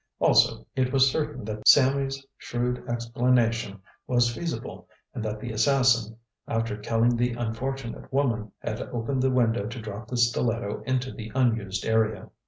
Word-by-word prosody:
Also, - - +3
it 130 -1 +1
was 135 -1 +4
certain 150 -6 -3
that 110 0 -4
Sammy's 135 0 +4
shrewd 125 0 -3
explanation 115 -4 0 0.2
was 120 -1 +2
feasible, 170 +5 -5 0.3
and 110 - -4
that 110 -1 -3
the 120 +2 -5
assassin, 115 -1 +2 0.3
after 115 -2 -1
killing 115 +3 +1
the 120 +1 0
unfortunate 120 +2 -4
woman, 120 -6 0
had 110 +1 -4
opened 125 +3 -2
the 130 - +3
window 115 -4 +1
to 120 +2 -6
drop 105 0 -7
the 125 - -3
stiletto 120 -2 0
into 130 0 0
the 110 -1 -8
unused 110 -7 0
area. 110 -1 0
120 Hz, 150 wpm, -26 LUFS, 110-130 Hz, 0.3 s, was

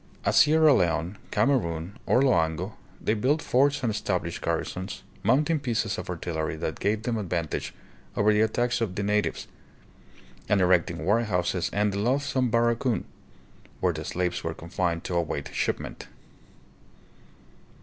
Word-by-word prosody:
At - - +2
Sierra 155 0 +6
Leone, 85 -1 0
Kamerun, 95 - +1 0.2
or 130 - +4
Loango, 90 - +1 0.3
they 110 - 0
built 130 +8 +1
forts 140 0 +2
and 115 - +1
established 90 -5 -2
garrisons, 95 +2 -3 0.2
mounting 150 +6 +2
pieces 110 -6 -1
of 90 - -7
artillery 80 -3 -3
that 80 0 -4
gave 105 +2 0
them 115 -2 -1
advantage 85 -5 -2 0.5
over 105 +1 +4
the 105 - +3
attacks 120 +2 +1
of 100 -5 -1
the 100 - -2
natives, 105 +1 0 1.0
and 100 - +4
erecting 85 -3 +2
warehouses 95 -4 +1
and 105 0 +1
the 100 - -2
loathsome 130 +2 +1
"barracoon," 120 +1 +1 0.7
where - - +1
the - - -5
slaves 90 -1 -2
were 80 0 -3
confined 85 0 -2
to - - -4
await 80 -4 -2
shipment. - - -3
105 Hz, 140 wpm, -27 LUFS, 85-120 Hz, 1.0 s, Sierra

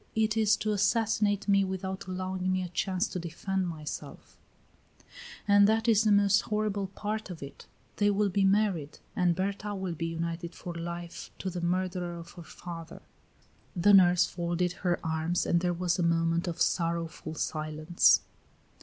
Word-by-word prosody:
It 220 0 +2
is 220 -2 +4
to 215 - -1
assassinate 210 -1 +1
me 200 -1 +4
without 190 0 -4
allowing 185 0 -2
me 185 0 0
a 180 - -5
chance 185 +3 -1
to 185 - -4
defend 185 +3 -2
myself; 155 -3 -7 1.1
and 200 0 +6
that 220 +2 +1
is 220 -2 +5
the 215 - +3
most 200 0 +5
horrible 210 -2 -1
part 210 +2 -4
of 170 -5 -7
it 140 - -11 0.3
they 205 0 +3
will 205 0 +2
be 195 +1 +1
married, 195 -7 +1 0.2
and 175 -2 +2
Berta 200 +2 -2
will 190 -2 -3
be 165 +1 -3
united 170 +1 -4
for 175 - -7
life 170 +1 -6
to 190 - -4
the 175 0 -4
murderer 180 0 -1
of 170 0 -9
her 175 - -11
father." 165 0 -9 0.7
The 195 +3 +4
nurse 180 -2 +6
folded 175 0 -1
her 175 -2 +1
arms 160 +2 0
and 170 - +2
there 180 0 +1
was 175 +1 -1
a - - +2
moment 165 +1 +1
of 170 -1 -4
sorrowful 165 -2 -1
silence. 155 +2 +2
180 Hz, 165 wpm, -29 LUFS, 170-200 Hz, 1.1 s, and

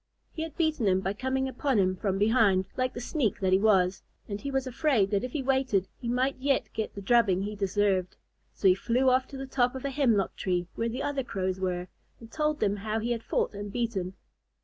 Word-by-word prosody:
He 320 - -6
had 320 -2 -6
beaten 315 -9 +1
him 190 0 +3
by 190 +1 -1
coming 260 +4 -1
upon 265 -1 0
him 185 -2 +2
from 195 0 -1
behind, 205 -3 +3
like 255 0 -1
the - - -4
sneak 245 - -1
that 185 -1 +1
he 190 - +5
was, 190 -3 +3 0.3
and 205 -1 -5
he 280 - -4
was 270 -1 -1
afraid 255 -6 +1
that 200 -1 +1
if 250 - -4
he 290 - -2
waited 255 -8 +1
he 240 - -6
might 255 +3 +1
yet 275 0 +1
get 220 - -4
the 200 - -7
drubbing 195 -4 +3
he 210 +1 -4
deserved. 195 -2 0 0.4
So 195 - +1
he 185 - +7
flew 245 +7 +2
off 255 +1 +2
to 275 - -9
the 270 - -5
top 255 -1 +1
of 265 - -6
a 280 - -1
hemlock 240 -8 +1
tree 180 -2 -1
where 230 0 -1
the 255 +4 -4
other 280 -2 -1
Crows 190 -5 -2
were, 180 -1 -2 0.3
and 230 0 -13
told 300 -1 0
them 205 0 +1
how 215 +2 -2
he 230 +2 -2
had 235 -1 -1
fought - - -1
and 205 0 -6
beaten. 200 -6 -2
225 Hz, 235 wpm, -28 LUFS, 195-260 Hz, 0.4 s, he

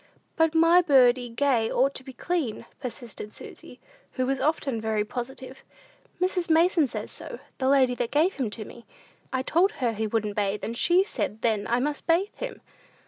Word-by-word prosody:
"But 325 -1 +2
my 330 +2 +6
birdie 255 -6 +4
gay 230 -2 +1
ought 275 +2 +2
to - - -7
be 265 - -9
clean," 280 -3 -3
persisted 240 -5 -7
Susy, - - -11 0.3
who 255 - -1
was 270 +1 -1
often 280 -6 0
very 215 -1 0
positive. 260 +3 -7 0.6
"Mrs. 365 -1 0
Mason 325 -1 +4
says - - -5
so - - -7 0.2
the 260 0 +1
lady 265 -3 +4
that 245 -1 -2
gave 315 +8 +2
him 255 -6 -2
to 215 0 -6
me. 235 +2 -13 0.4
I 260 0 -1
told 360 +9 +2
her 240 -3 -1
he 220 0 -2
wouldn't 210 -1 -1
bathe, 205 0 -1
and 230 - -3
she 350 +9 +3
said 220 - -4
then 215 -3 +1
I 240 +1 +1
must 290 +3 -3
bathe 350 +5 +2
him." - - -7
260 Hz, 185 wpm, -26 LUFS, 230-320 Hz, 0.6 s, my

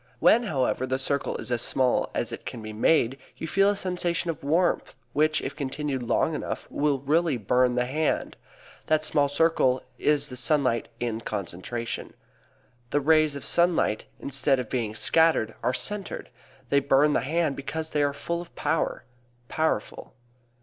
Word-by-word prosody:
When, 235 - +5
however, 130 -6 0
the 130 0 0
circle 140 +1 -1
is - - -5
as 120 -1 +1
small 130 0 +1
as - - -1
it - - -7
can 110 - -7
be 110 0 -6
made 130 +3 +2 0.2
you 160 - -5
feel 195 +4 +3
a 205 - +1
sensation 175 -3 -1
of 155 - -11
warmth 170 +5 +1 0.2
which, 155 +1 +2
if - - -4
continued 140 -1 -3
long 125 +6 +1
enough, 150 - -4
will 145 -1 +1
really 155 0 +2
burn 125 +3 +2
the 125 0 +1
hand. 150 +5 -1 0.5
That 155 0 +2
small 145 -2 +2
circle 145 -4 +2 0.2
is 150 -1 +2
the 125 - -7
sunlight 130 -3 +1
in 115 -2 -2
concentration. 105 +3 -5 0.7
The 145 - +2
rays 155 0 +3
of 140 - -5
sunlight, 170 -10 +2
instead 135 0 +1
of 125 -3 -5
being 115 -4 -2
scattered, 160 -5 +2
are - - +1
centered. 205 +9 -4 0.4
They 140 - +4
burn 140 +2 +3
the - - +3
hand 155 +2 0
because 160 +3 -5
they 150 - +1
are 145 0 +2
full 170 +4 -3
of 175 - -13
power 165 - -1 0.5
powerful. 160 0 -2
140 Hz, 165 wpm, -26 LUFS, 125-160 Hz, 0.7 s, When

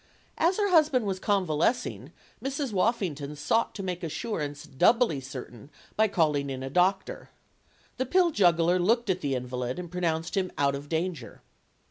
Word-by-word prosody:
As 345 +3 +3
her 405 -2 +1
husband 300 -8 +4
was 190 -2 -2
convalescing, 195 +4 0 0.3
Mrs. 270 -2 -3
Woffington 180 - -1
sought 225 +10 0
to 195 - -5
make 180 -1 -4
assurance 150 -4 -4
doubly 225 - +3
certain 130 -2 -9 0.3
by 220 +1 +4
calling 150 -7 +1
in 130 -1 -5
a 135 - -5
doctor. 185 +4 0 0.7
The 260 0 -1
pill 355 +3 +3
juggler 175 - +3
looked 225 +3 +2
at 185 0 -3
the 140 -2 -1
invalid 125 0 -4
and 175 -2 -7
pronounced 165 -2 -1
him 185 -2 0
out 140 -1 +2
of 140 +1 -7
danger. 165 -6 -3
180 Hz, 155 wpm, -27 LUFS, 145-225 Hz, 0.7 s, husband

